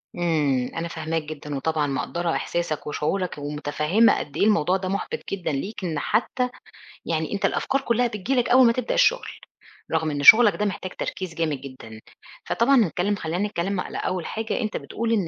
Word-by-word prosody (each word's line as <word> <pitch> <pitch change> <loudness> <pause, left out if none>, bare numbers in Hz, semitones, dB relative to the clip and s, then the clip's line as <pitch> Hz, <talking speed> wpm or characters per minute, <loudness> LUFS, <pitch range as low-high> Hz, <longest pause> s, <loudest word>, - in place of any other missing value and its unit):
إمم، 150 -7 +1
أنا 165 +1 -2
فاهماك 160 -1 -3
جدًا 150 -1 -7
وطبعًا 150 +1 0
مقدّرة 170 +5 -2
إحساسك 170 -4 -2
وشعورك 175 +4 -2
ومُتفهِّمة 150 +8 +1
قد 145 - -7
إيه - - +2
الموضوع 190 -3 +3
ده 185 -1 -4
مُحبط 200 - -3
جدًا 185 -5 -2
ليك 190 +9 -4
إن 160 -4 -2
حتّى 250 - 0 0.6
يعني 160 +2 -2
أنت 200 - -1
الأفكار 270 0 0
كُلّها 240 -1 +1
بتيجي 225 +5 -2
لك 245 -1 +1
أوّل 255 0 +7
ما 230 - +4
تبدأ 250 -1 -2
الشُغل، - - +3 0.6
رغم 160 -1 0
إن 145 0 -3
شُغلك 225 +2 +9
ده 210 - -1
محتاج 185 -2 -4
تركيز 185 -3 -5
جامد 155 -5 -1
جدًا. 115 -5 -11 0.4
فطبعًا 265 +4 +3
نتكلّم 200 -1 +1
خلّينا 180 +4 -2
نتكلّم 195 0 -2
على - - -5
أول 185 -3 -2
حاجة 220 0 -3
أنت 215 -1 -2
بتقول 230 0 -4
إن 195 -6 +1
175 Hz, 180 wpm, -24 LUFS, 155-215 Hz, 0.6 s, شُغلك